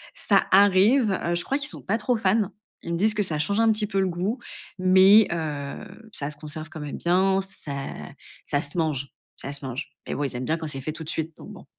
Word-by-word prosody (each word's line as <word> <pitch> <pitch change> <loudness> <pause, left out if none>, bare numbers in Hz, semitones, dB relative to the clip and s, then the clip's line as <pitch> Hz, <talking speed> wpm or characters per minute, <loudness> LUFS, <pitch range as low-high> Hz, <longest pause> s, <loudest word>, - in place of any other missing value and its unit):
Ça 200 -2 +2
arrive, 205 +5 +5
heu. 170 0 +1
Je 175 - +1
crois 275 +2 -1
qu'ils 285 +1 -2
sont - - -6
pas 215 +4 0
trop 235 +2 0
fans. 205 0 +2 0.3
Ils 170 - -4
me - - 0
disent 215 +3 +4
que 210 -1 0
ça 155 -5 -1
change 200 +8 0
un 225 -1 +5
petit 210 -1 +1
peu 195 -2 -1
le 190 - +2
goût, 185 +8 -2 0.4
mais, 190 +3 +7
heu, 160 +6 -5
ça 145 +1 -3
se 150 - -6
conserve 155 +1 -7
quand 155 - -9
même 150 -1 -5
bien. 190 +2 +2
Ça 190 -6 -6 0.8
ça 145 - +1
se 145 +5 -4
mange, 140 -4 -1 0.3
ça 140 - -6
se 140 - -8
mange. 130 +1 -5 0.2
Eh - - -3
oui, 145 -1 -1
ils - - -9
aiment 125 +1 -3
bien 160 +1 0
quand 160 -1 -5
c'est 135 -2 -4
fait 155 - -3
tout 160 - -7
de 155 - -7
suite, 160 0 -3
donc - - -11
bon. - - -13
175 Hz, 250 wpm, -25 LUFS, 150-205 Hz, 0.8 s, mais